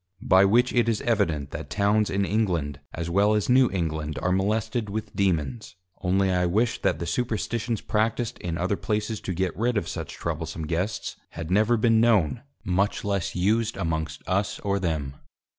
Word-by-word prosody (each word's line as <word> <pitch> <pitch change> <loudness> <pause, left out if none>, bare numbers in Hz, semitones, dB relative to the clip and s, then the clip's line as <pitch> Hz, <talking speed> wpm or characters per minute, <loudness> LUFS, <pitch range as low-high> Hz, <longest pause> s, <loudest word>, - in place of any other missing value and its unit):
By 95 +1 +6
which 120 +5 +3
it 120 -1 +3
is 110 - 0
evident 85 - 0
that - - -6
Towns 105 +1 +2
in 100 0 +1
England 85 -9 0
as 85 0 -4
well 100 +5 +3
as 105 - 0
New 130 0 +5
England 80 -5 -2
are 90 - +2
molested 110 +3 0
with 110 +1 -5
Dæmons, 95 - -1 0.3
only 95 +1 +2
I 90 -1 +2
wish 115 +7 +1
that - - +1
the 85 - -4
Superstitions 115 +2 -2
practiced 110 +2 -1
in 85 -2 -3
other 95 +4 0
places 105 0 -2
to 95 - -4
get 95 +1 -1
rid 120 +2 0
of - - -1
such - - -5
troublesome 80 -1 -4
Guests 85 +7 -2
had 85 +1 -6
never 110 +5 +4
been 110 0 +4
known, 115 -3 +3 0.2
much 95 +4 0
less 100 -3 -1
used 110 +5 +1
amongst 80 -4 -3
us 100 +2 0
or 100 0 0
them. 75 -6 -2
100 Hz, 175 wpm, -26 LUFS, 85-110 Hz, 0.3 s, By